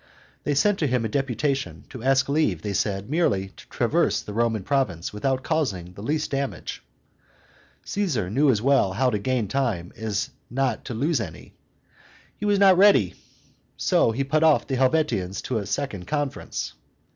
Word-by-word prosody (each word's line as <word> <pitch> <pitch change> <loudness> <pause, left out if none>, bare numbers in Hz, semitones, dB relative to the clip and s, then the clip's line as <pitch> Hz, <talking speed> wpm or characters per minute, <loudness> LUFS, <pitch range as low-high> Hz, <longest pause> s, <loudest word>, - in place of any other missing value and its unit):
They 145 - +1
sent 205 +7 +3
to 150 - +1
him 125 -3 0
a - - -1
deputation, 135 +1 -2
to 130 - -9
ask 130 +1 +3
leave, 140 - +1
they 105 - -2
said, 100 +1 -1
merely 115 - +1
to - - -17
traverse - - +1
the 105 - -7
Roman 115 -2 0
province 100 - -1
without 130 +5 -1
causing 100 - -1
the 100 - -10
least 150 +7 -1
damage. 140 -1 -3 1.0
Caesar 160 - -1
knew 140 +6 +3
as 110 -4 +2
well 135 -8 +3
how 125 +5 +2
to 105 - -1
gain 120 0 0
time 105 -8 -1
as 110 -2 -2 0.2
not 130 -2 -1
to 120 - -5
lose 140 +2 +1
any: 80 -7 -8 0.8
he 210 - -5
was 205 -1 +3
not 190 -2 +6
ready; 130 - +5 0.6
so - - +3
he 130 +5 -1
put 155 +3 +1
off 160 -2 +4
the 135 - -2
Helvetians 130 - +1
to 120 -4 -1
a 100 - -5
second 105 -7 -3
conference. 145 -3 -3
130 Hz, 170 wpm, -24 LUFS, 105-145 Hz, 1.0 s, not